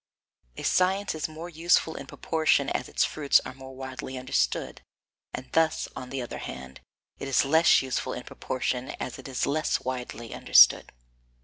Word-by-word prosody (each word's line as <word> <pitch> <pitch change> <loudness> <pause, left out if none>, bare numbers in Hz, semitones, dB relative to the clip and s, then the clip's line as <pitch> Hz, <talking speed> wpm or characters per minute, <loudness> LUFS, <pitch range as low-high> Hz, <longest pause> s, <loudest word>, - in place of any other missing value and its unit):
A - - -6
science 190 +2 +2
is 155 -2 -3
more 160 +2 -8
useful 165 -1 +2
in - - -8
proportion 160 -2 +1
as - - -2
its - - +2
fruits 145 -2 +3
are - - -6
more 130 0 -11
widely 130 0 -7
understood, 60 - -1 0.5
and 125 - -7
thus, 165 -1 +2
on 125 - -7
the 135 -2 -3
other 120 - -7
hand, 65 +1 -8 0.4
it 135 - -5
is 135 0 +3
less 160 +1 +5
useful 130 -1 -2
in - - -6
proportion 130 0 -3
as 125 - -5
it 130 - -9
is 130 -2 -1
less 155 +1 0
widely 125 -2 -5
understood. - - +6
135 Hz, 170 wpm, -27 LUFS, 125-160 Hz, 0.5 s, understood